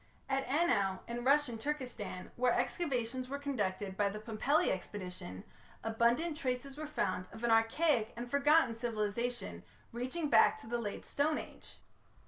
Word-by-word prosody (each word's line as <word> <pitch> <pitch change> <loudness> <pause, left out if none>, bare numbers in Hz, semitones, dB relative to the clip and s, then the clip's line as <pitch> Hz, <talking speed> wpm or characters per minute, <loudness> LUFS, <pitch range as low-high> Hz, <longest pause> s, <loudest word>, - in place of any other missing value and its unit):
At 270 0 0
Anau 245 - +2
in 240 +1 -4
Russian 275 -3 +3
Turkestan, 250 -9 -4
where 245 0 +3
excavations 255 -5 -1
were 280 - -2
conducted 205 -9 -2
by 200 0 +2
the 210 +2 -5
Pumpelly 230 +7 +1
expedition, 180 - -6 0.4
abundant 235 +9 +2
traces 265 -2 -2
were 305 +1 -5
found 185 -10 -1
of 225 - -10
an 235 - +3
archaic 225 +2 +3
and 240 +1 -4
forgotten 280 0 +4
civilization 225 - -2 0.3
reaching 260 +7 -2
back - - +5
to - - -12
the 240 +1 -1
Late 210 -3 -4
Stone 300 +2 +1
Age. - - -9
240 Hz, 145 wpm, -34 LUFS, 215-280 Hz, 0.4 s, back